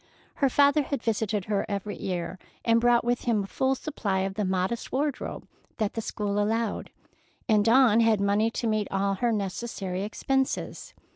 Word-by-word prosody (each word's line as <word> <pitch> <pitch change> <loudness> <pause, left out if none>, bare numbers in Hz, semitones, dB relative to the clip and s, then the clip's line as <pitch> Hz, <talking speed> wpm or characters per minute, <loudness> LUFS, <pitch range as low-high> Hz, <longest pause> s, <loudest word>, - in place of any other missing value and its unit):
Her 275 - +3
father 285 +3 +4
had 275 -3 -3
visited 215 -3 -1
her 205 -2 0
every 200 0 -3
year 180 0 -4 0.3
and 230 0 +4
brought 240 0 +4
with 240 0 0
him 225 -4 +2
a - - -5
full 265 +6 0
supply 205 -10 -2
of 190 0 -2
the 210 +1 -2
modest 190 +4 -1
wardrobe 285 +1 -2 0.3
that 215 -3 -1
the 225 - -3
school 205 -1 -2
allowed, 220 +1 -1 0.6
and 215 -3 +4
Dawn 230 0 +5
had 225 -2 +4
money 200 +3 +2
to 230 - -4
meet 215 -2 +1
all 195 0 0
her 235 +5 0
necessary 195 -2 -3
expenses. 265 +6 -2
215 Hz, 170 wpm, -27 LUFS, 200-240 Hz, 0.6 s, Dawn